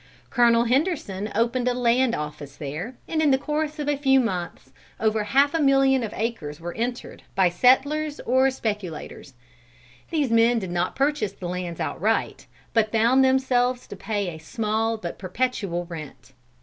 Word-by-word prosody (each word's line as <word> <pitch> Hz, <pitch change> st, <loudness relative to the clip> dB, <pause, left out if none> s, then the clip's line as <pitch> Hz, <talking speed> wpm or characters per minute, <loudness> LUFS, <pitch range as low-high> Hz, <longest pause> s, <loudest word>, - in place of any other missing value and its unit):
Colonel 235 Hz, -1 st, +4 dB
Henderson 240 Hz, -, -1 dB
opened 235 Hz, +3 st, +1 dB
a 250 Hz, -, +1 dB
land 245 Hz, 0 st, +2 dB
office 150 Hz, -2 st, -6 dB
there, 160 Hz, -, -5 dB
and 315 Hz, -1 st, 0 dB
in 305 Hz, -, +4 dB
the 265 Hz, -, +4 dB
course 300 Hz, +2 st, -2 dB
of 295 Hz, -1 st, -4 dB
a 290 Hz, -, +2 dB
few 270 Hz, -1 st, +3 dB
months, 180 Hz, -, -3 dB, 0.3 s
over 215 Hz, -1 st, +1 dB
half 280 Hz, +6 st, +3 dB
a 330 Hz, -, +1 dB
million 270 Hz, -1 st, +4 dB
of 220 Hz, -3 st, -4 dB
acres 190 Hz, -10 st, -4 dB
were 170 Hz, +1 st, -6 dB
entered, 240 Hz, +2 st, -4 dB
by 185 Hz, -2 st, +4 dB
settlers 285 Hz, -, +2 dB
or 260 Hz, +2 st, +3 dB
speculators. 205 Hz, -, -5 dB, 0.7 s
These 295 Hz, -7 st, 0 dB
men 230 Hz, +1 st, +4 dB
did 190 Hz, -5 st, -3 dB
not 175 Hz, +1 st, -1 dB
purchase 275 Hz, -7 st, 0 dB
the 185 Hz, -3 st, -7 dB
lands 180 Hz, -1 st, -4 dB
outright, -, -, -1 dB, 0.3 s
but 220 Hz, -2 st, +2 dB
bound 235 Hz, +4 st, +4 dB
themselves 255 Hz, -1 st, +2 dB
to -, -, -9 dB
pay 205 Hz, -4 st, -2 dB
a 160 Hz, -2 st, -8 dB
small 225 Hz, +4 st, -1 dB
but 175 Hz, -5 st, -7 dB
perpetual 195 Hz, -3 st, -2 dB
rent. 155 Hz, -5 st, -10 dB
230 Hz, 160 wpm, -24 LUFS, 185-265 Hz, 0.7 s, Colonel